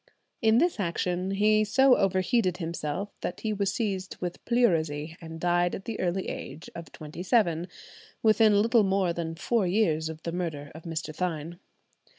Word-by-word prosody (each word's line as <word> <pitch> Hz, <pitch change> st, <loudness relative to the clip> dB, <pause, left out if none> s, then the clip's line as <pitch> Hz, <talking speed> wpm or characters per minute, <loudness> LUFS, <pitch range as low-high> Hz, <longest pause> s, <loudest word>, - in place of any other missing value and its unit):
In 220 Hz, -1 st, +4 dB
this 345 Hz, -1 st, +2 dB
action 180 Hz, 0 st, -1 dB
he 210 Hz, +2 st, +3 dB
so 255 Hz, +4 st, +5 dB
overheated 190 Hz, 0 st, +1 dB
himself 165 Hz, +2 st, -3 dB
that 180 Hz, -, -4 dB
he 215 Hz, -1 st, -1 dB
was 200 Hz, -2 st, 0 dB
seized 195 Hz, -3 st, -3 dB
with 175 Hz, -1 st, -5 dB
pleurisy, 160 Hz, -10 st, +1 dB
and 165 Hz, 0 st, -8 dB
died 175 Hz, 0 st, +2 dB
at 190 Hz, -, -9 dB
the 230 Hz, -, -4 dB
early 185 Hz, +1 st, -1 dB
age 160 Hz, -, -7 dB
of 165 Hz, -4 st, -9 dB
twenty 155 Hz, +2 st, -9 dB
seven, 180 Hz, -4 st, +2 dB, 0.6 s
within 215 Hz, -2 st, +5 dB
little 230 Hz, 0 st, +4 dB
more 190 Hz, -3 st, +1 dB
than 165 Hz, -1 st, -4 dB
four 190 Hz, +4 st, 0 dB
years 165 Hz, -5 st, +1 dB
of 160 Hz, 0 st, -8 dB
the 170 Hz, -, -3 dB
murder 160 Hz, -5 st, -4 dB
of 160 Hz, +2 st, -12 dB
Mr. 160 Hz, -2 st, -4 dB
Thynne. 170 Hz, -1 st, -3 dB
180 Hz, 165 wpm, -28 LUFS, 165-210 Hz, 0.6 s, so